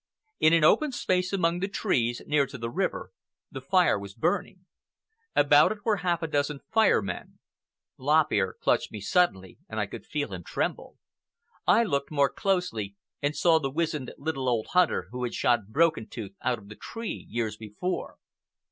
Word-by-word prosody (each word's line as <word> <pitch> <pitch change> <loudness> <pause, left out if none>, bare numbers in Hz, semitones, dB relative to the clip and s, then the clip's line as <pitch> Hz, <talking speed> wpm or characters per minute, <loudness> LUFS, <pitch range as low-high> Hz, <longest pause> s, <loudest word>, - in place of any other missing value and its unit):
In 155 - +5
an 165 -2 +4
open 300 - +4
space 180 -7 0
among 175 -3 +1
the 195 - -1
trees, 125 - 0
near 145 -2 +2
to 140 - -8
the 115 0 -4
river, - - -2 0.4
the 135 - -7
fire 180 - +3
was 100 0 -9
burning. 180 - -1 0.7
About - - +6
it 210 -1 -7
were 215 -3 +2
half 175 -2 -1
a - - 0
dozen 145 -1 -1
Fire 220 - +4
Men. 90 -3 -6 0.6
Lop 150 +4 +3
Ear 95 -3 +1
clutched - - +1
me 105 - -6
suddenly, 100 - 0
and 110 - -4
I 105 - +1
could 100 - -10
feel 145 -9 -3
him 90 -2 -6
tremble. - - -3 0.7
I 230 - +6
looked 140 -10 -1
more 140 -2 +2
closely, 180 - -1 0.3
and 145 +1 0
saw 165 -2 +4
the 135 -3 -2
wizened 150 -3 -2
little 135 -4 -2
old 115 -3 -1
hunter 180 - +2
who 125 0 -5
had 120 - -3
shot 120 -5 +2
Broken 140 -2 +2
Tooth 105 -3 -7
out 125 -1 0
of 105 -2 -15
the 105 - -9
tree 230 - -6
years 110 -2 -2
before. 110 - -5
145 Hz, 180 wpm, -27 LUFS, 110-180 Hz, 0.7 s, About